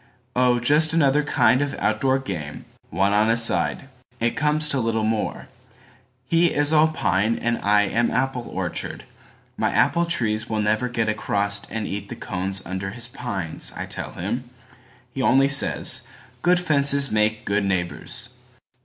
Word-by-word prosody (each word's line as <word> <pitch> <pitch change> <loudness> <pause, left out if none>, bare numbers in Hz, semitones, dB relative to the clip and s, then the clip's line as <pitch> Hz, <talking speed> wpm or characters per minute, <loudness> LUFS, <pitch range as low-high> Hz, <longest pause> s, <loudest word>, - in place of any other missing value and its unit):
Oh, 125 -1 +3
just 150 +6 +3
another 150 -3 +3
kind 130 -3 +2
of 145 -1 -2
outdoor 130 +5 +1
game, 85 - -6 0.2
One 95 +4 +1
on 105 +2 +3
a 115 - +3
side. 115 +3 +3 0.3
It 115 0 0
comes 150 +1 +2
to 140 - +2
little 115 -2 -1
more:He 125 +6 -3
is 145 -1 +1
all 155 0 +5
pine 110 - 0
and 120 0 -1
I 105 0 +3
am 115 +3 0
apple 125 -1 -2
orchard.My - - -5
apple 170 0 +2
trees 115 -8 0
will 110 -1 -1
never 110 +4 0
get 115 -2 -1
acrossAnd 100 0 -1
eat 100 0 -6
the - - -6
cones 95 0 -4
under 95 +1 -4
his 120 +4 -8
pines, 95 -10 -4
I - - -5
tell - - -5
him. 120 +8 -4 0.6
He 135 - -3
only 135 +2 +4
says, 140 0 +2 0.4
"Good 180 0 +3
fences 140 -4 +3
make 110 0 0
good 100 0 0
neighbors." 95 +6 -2
120 Hz, 150 wpm, -22 LUFS, 105-135 Hz, 0.6 s, all